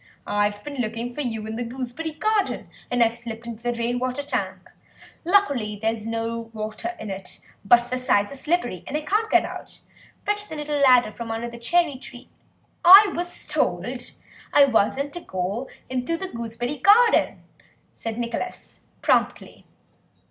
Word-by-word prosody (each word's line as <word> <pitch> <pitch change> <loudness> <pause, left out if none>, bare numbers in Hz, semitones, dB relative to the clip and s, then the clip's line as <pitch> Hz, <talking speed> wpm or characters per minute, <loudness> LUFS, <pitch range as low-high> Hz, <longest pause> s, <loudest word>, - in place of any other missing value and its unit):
I've 205 0 0
been 290 -1 -7
looking 230 +2 -3
for 295 - -3
you 225 -5 -3
in 220 +1 -5
the 245 - -2
gooseberry 255 +6 -5
garden, 430 +5 0 0.2
and 245 -1 +3
I've 230 0 +1
slipped 235 -1 -7
into 230 -1 -7
the 240 0 -1
rain 235 +1 -1
water 255 +3 -2
tank. 190 -10 -3 0.5
Luckily 285 - +2
there's 225 0 -2
no 230 0 -3
water 215 +10 -4
in 215 - -5
it, 190 -1 -5 0.2
but 240 +4 +4
the 255 - -1
sides 205 -4 +2
are - - -7
slippery 275 - -1
and 295 - -1
I - - -3
can't 425 +7 0
get - - +4
out. - - -7 0.4
Fetch 415 0 -1
the 315 - -6
little 295 -1 -2
ladder 250 -5 +5
from 230 +1 -7
under 225 +1 -3
the 235 - -9
cherry 315 +3 +2
tree—" 250 -1 -13 0.5
"I 390 +3 +10
was 350 +1 -3
told - - -1 0.4
I 285 - +7
wasn't 270 +3 +1
to 350 - -5
go 195 - -3 0.2
into 255 +6 -2
the 380 +2 -5
gooseberry 235 +4 -4
garden," 435 - +4 0.5
said 225 -1 -5
Nicholas 240 +9 -5 0.2
promptly. - - 0
245 Hz, 165 wpm, -24 LUFS, 225-295 Hz, 0.5 s, I